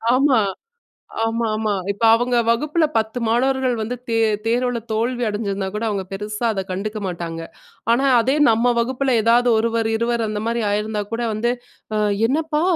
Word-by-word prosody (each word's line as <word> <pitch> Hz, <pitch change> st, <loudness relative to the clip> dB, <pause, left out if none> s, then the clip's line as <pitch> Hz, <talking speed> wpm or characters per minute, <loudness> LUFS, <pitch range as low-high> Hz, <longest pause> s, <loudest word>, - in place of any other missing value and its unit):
ஆமா. 265 Hz, -2 st, +4 dB, 0.9 s
ஆமாமா. 220 Hz, -2 st, -1 dB, 0.2 s
இப்ப 200 Hz, -, -12 dB
அவங்க 245 Hz, +1 st, +1 dB
வகுப்புல 300 Hz, +8 st, +2 dB
10 220 Hz, +2 st, 0 dB
மாணவர்கள் 260 Hz, +2 st, +1 dB
வந்து 225 Hz, +3 st, -3 dB
தே 230 Hz, -, 0 dB, 0.3 s
தேர்வுல 245 Hz, +1 st, 0 dB
தோல்வி 240 Hz, +3 st, 0 dB
அடஞ்சிருந்தா 200 Hz, -2 st, -2 dB
கூட 210 Hz, +2 st, -2 dB
அவங்க 200 Hz, -2 st, -1 dB
பெருசா 210 Hz, +3 st, -3 dB
அத 195 Hz, -2 st, -2 dB
கண்டுக்க 210 Hz, +4 st, -3 dB
மாட்டாங்க. 170 Hz, -2 st, -5 dB, 0.5 s
ஆனா 250 Hz, +4 st, +2 dB, 0.2 s
அதே 260 Hz, +4 st, +1 dB, 0.2 s
நம்ம 235 Hz, +2 st, +3 dB
வகுப்புல 260 Hz, +2 st, 0 dB
எதாவது 240 Hz, +2 st, +4 dB
ஒருவர், 230 Hz, 0 st, 0 dB
இருவர் 235 Hz, 0 st, 0 dB
அந்த 210 Hz, 0 st, -3 dB
மாரி 235 Hz, 0 st, 0 dB
ஆயிருந்தா 210 Hz, +1 st, -1 dB
கூட 230 Hz, +1 st, -2 dB
வந்து, 235 Hz, +3 st, 0 dB, 0.4 s
அ -, -, +1 dB, 0.3 s
என்னப்பா 305 Hz, +2 st, 0 dB
230 Hz, 150 wpm, -21 LUFS, 215-245 Hz, 0.9 s, ஆமா